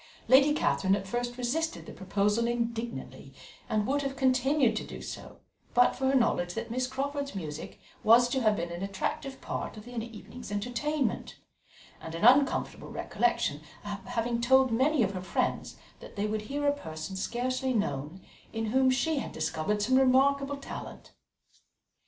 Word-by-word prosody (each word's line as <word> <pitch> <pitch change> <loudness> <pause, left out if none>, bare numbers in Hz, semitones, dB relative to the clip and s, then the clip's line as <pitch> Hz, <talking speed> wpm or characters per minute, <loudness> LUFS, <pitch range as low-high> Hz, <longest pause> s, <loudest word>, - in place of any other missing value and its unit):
Lady 275 +3 +7
Catherine 190 - +2
at 200 -1 -4
first 240 +4 -3
resisted 315 +7 -2
the - - -9
proposal 205 +4 0
indignantly, 235 0 -4 0.3
and 215 -2 +1
would 280 +4 +1
have 275 -1 -3
continued 265 0 +3
to - - -2
do - - -8
so - - -9 0.3
but 245 0 +5
for 265 - 0
her 270 - +3
knowledge 175 -8 +2
that - - -4
Miss 255 +1 0
Crawford's 280 +1 -3
music 155 -5 -6 0.2
was 235 +2 +7
to 265 +1 0
have 215 -2 +3
been 170 -2 -3
an 170 +1 -6
attractive 200 +7 -3
part - - -4
of 210 - -10
the 245 - -10
evening's 230 0 -7
entertainment, 245 +8 -1 0.7
and 160 0 -7
an 170 - 0
uncomfortable 270 +3 +3
recollection 235 -11 0 0.2
of 205 -1 -5
having 235 -1 -1
told 265 +1 +5
many 265 +3 +3
of 195 - 0
her 185 - -4
friends 185 - -2 0.2
that - - -12
they 205 0 -1
would 215 0 -1
hear 285 +7 -3
a 285 - +4
person 160 - -7
scarcely 255 +6 -1
known, 170 - -2 0.3
in 225 -1 -2
whom 260 +1 +4
she 290 +4 +1
had - - -5
discovered 160 +6 -1
some 260 +4 +3
remarkable 275 +2 +3
talent. 275 - -8
240 Hz, 165 wpm, -29 LUFS, 205-265 Hz, 0.7 s, Lady